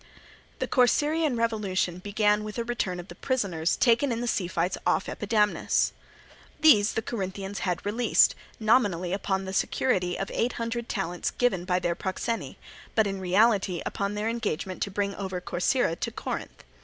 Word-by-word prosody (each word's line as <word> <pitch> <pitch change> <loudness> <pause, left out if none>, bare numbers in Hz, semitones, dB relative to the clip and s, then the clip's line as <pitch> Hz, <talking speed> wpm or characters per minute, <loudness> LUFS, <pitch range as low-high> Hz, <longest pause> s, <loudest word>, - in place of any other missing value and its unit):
The - - -2
Corcyraean 295 +3 +2
revolution 200 -6 0
began 210 +2 +1
with 215 0 -6
the 235 - -1
return 225 -7 -2
of 175 - -8
the - - -9
prisoners 190 -11 0
taken 240 +2 +3
in 230 - -1
the 240 - -2
sea 200 -6 0
fights 175 +1 -1
off - - +1
Epidamnus. 210 -2 +1 0.7
These 220 -10 +6
the 225 - -2
Corinthians 195 -2 -4
had 180 0 -2
released, 230 +4 +4 0.3
nominally 205 -6 +2
upon 190 -1 -1
the 190 - -5
security 180 -4 +1
of 195 - -4
eight 240 +2 0
hundred 230 0 -3
talents 180 -5 -2
given 190 -8 0
by 180 -1 +1
their 175 -1 0
proxeni, 205 +5 -3 0.4
but 220 - +4
in 195 -1 -3
reality 190 -1 +2
upon 200 +1 -2
their 210 +1 -2
engagement 210 -6 -3
to - - 0
bring 200 0 -1
over 190 -2 -3
Corcyra 180 +2 0
to - - -1
Corinth. 230 - -6
205 Hz, 165 wpm, -27 LUFS, 185-230 Hz, 0.7 s, These